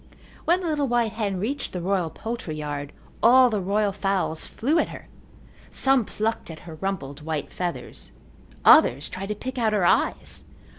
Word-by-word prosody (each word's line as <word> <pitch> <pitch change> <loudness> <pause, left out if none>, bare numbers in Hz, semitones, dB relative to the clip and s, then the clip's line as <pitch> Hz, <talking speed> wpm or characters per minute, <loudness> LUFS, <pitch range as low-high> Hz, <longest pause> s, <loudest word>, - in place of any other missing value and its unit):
When 350 +3 +3
the 355 - -3
little 295 -3 0
white 240 -2 +1
hen 205 -3 -2
reached 270 +8 -3
the 180 - -3
royal 180 -1 0
poultry 225 -5 -5
yard 145 -1 -4 0.3
all 250 +2 +7
the 210 -2 0
royal 200 +2 +1
fowls 195 -5 -1
flew 300 +8 0
at - - +1
her. - - -10 0.6
Some 270 -4 +3
plucked 220 -1 -2
at 160 - -9
her 165 - -10
rumpled 155 -5 -4
white 155 -2 -4
feathers. 175 -1 -5 0.5
Others 140 +4 +6
tried 190 +1 -5
to 210 - -1
pick 260 +4 -5
out 220 -2 +2
her 200 -4 +2
eyes. - - +1
200 Hz, 170 wpm, -25 LUFS, 170-240 Hz, 0.6 s, all